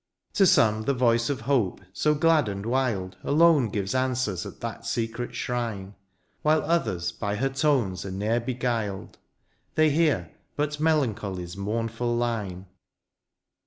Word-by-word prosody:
To 195 - +5
some, 110 -6 +4
the 140 - +1
voice 115 -2 +2
of 135 -5 -2
hope, 120 -6 +1
so 150 +6 +2
glad 155 -5 +3
and 100 0 -5
wild. 115 -7 -1
Alone 155 -5 +4
gives 100 0 -2
answers 130 -7 -1
at - - -11
that - - -5
secret 115 +1 -3
shrine; 110 -5 -3 0.5
While 155 +1 +3
others 110 - 0
by 100 0 -3
her 135 +5 0
tones 135 - +1
are 100 - -5
ne'er 105 +5 0
beguiled, 120 -5 -3 0.6
They 155 -1 +4
hear 145 - +1 0.2
but 150 0 -2
melancholy's 105 - 0
mournful 115 +4 -2
line. 105 -6 -2
120 Hz, 135 wpm, -26 LUFS, 100-140 Hz, 0.6 s, To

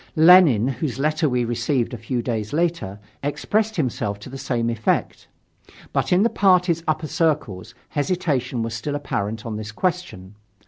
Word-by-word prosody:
Lenin, 160 - +7
whose 135 -1 -3
letter 155 +2 +1
we 125 -1 0
received 120 +2 -1
a - - -4
few 120 +2 -3
days 110 -2 -3
later, 165 - -1 0.2
expressed 215 +9 -1
himself 115 - -2
to 105 +5 -11
the 135 - -6
same 120 -3 -1
effect. 115 -1 -1 0.7
But - - 0
in 180 +3 +4
the - - +5
party's 180 -3 +3
upper 155 0 0
circles 145 - -1
hesitation 140 -7 -1
was 115 0 -4
still 130 +6 -3
apparent 110 -6 -3
on 110 -2 -4
this 110 0 -6
question. 110 - -3
135 Hz, 155 wpm, -22 LUFS, 115-165 Hz, 0.7 s, Lenin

